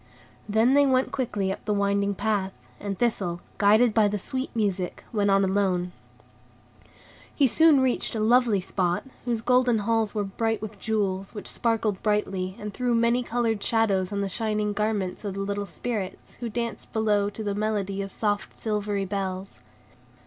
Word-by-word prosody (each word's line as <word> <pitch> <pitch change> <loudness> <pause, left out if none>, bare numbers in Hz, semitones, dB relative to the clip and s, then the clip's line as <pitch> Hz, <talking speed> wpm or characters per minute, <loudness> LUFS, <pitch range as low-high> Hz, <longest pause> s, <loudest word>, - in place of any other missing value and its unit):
Then 220 +5 +4
they 285 0 +5
went 260 0 +2
quickly 205 -7 -1
up - - -6
the 210 -1 +1
winding 200 0 +1
path, 200 -2 -1 0.3
and 200 -2 -4
Thistle, 195 -8 0 0.2
guided 215 +3 +5
by 215 -1 +4
the 205 0 -1
sweet 260 +7 -3
music, 195 -5 -1
went 205 -2 +2
on 195 0 +4
alone. 190 -2 +1 1.4
He 285 - +4
soon 300 +2 +5
reached 255 -2 0
a - - -1
lovely 230 -1 +4
spot, 180 -1 -1 0.2
whose 235 -3 -1
golden 250 0 +3
halls 220 0 0
were 210 - +1
bright 225 +3 -1
with 210 -1 -7
jewels, 195 -2 -1
which 205 - -6
sparkled 225 -4 0
brightly, 195 -3 -1
and 210 -1 -6
threw 245 +1 0
many 235 +2 +3
colored 230 -3 -1
shadows 205 -5 +1
on 200 0 -1
the 200 - 0
shining 210 0 -1
garments 205 -3 -1
of 200 -2 -4
the 195 - -3
little 200 0 -2
Spirits, 210 -6 -5
who 235 -1 -3
danced 235 +1 -4
below 210 -2 +2
to 220 +2 -7
the 205 -1 -1
melody 200 -2 -1
of 195 0 -5
soft, 205 -1 -2
silvery 210 -2 -1
bells. 190 -1 -4
210 Hz, 170 wpm, -26 LUFS, 195-225 Hz, 1.4 s, they